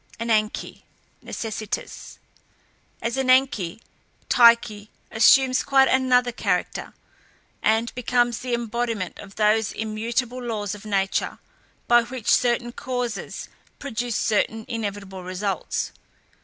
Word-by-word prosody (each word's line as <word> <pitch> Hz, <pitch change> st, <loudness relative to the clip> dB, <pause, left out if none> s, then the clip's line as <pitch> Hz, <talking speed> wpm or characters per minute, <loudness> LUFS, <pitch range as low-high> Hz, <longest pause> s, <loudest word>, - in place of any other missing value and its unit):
ANANKE 220 Hz, -2 st, -1 dB, 0.4 s
(NECESSITAS). 215 Hz, -2 st, -5 dB, 0.9 s
As 235 Hz, +2 st, -1 dB
Ananke, 255 Hz, -8 st, +2 dB, 0.5 s
Tyche 235 Hz, -3 st, +5 dB, 0.2 s
assumes 255 Hz, +3 st, +5 dB
quite 270 Hz, -1 st, +4 dB
another 250 Hz, -1 st, +3 dB
character, 190 Hz, -6 st, -2 dB, 0.7 s
and 225 Hz, +2 st, +1 dB
becomes 240 Hz, -1 st, +1 dB
the 250 Hz, -1 st, -1 dB
embodiment 230 Hz, -4 st, -3 dB
of 200 Hz, -1 st, -11 dB
those 215 Hz, 0 st, +2 dB
immutable 230 Hz, +3 st, -2 dB
laws 215 Hz, -4 st, -3 dB
of 210 Hz, +1 st, -10 dB
nature, 195 Hz, -2 st, -1 dB, 0.5 s
by 240 Hz, 0 st, +6 dB
which 245 Hz, -1 st, -3 dB
certain 240 Hz, -1 st, +2 dB
causes 245 Hz, -4 st, -4 dB, 0.3 s
produce 240 Hz, -3 st, -3 dB
certain 220 Hz, +1 st, 0 dB
inevitable 205 Hz, -5 st, -5 dB
results. 185 Hz, 0 st, -3 dB
230 Hz, 100 wpm, -24 LUFS, 210-245 Hz, 0.9 s, by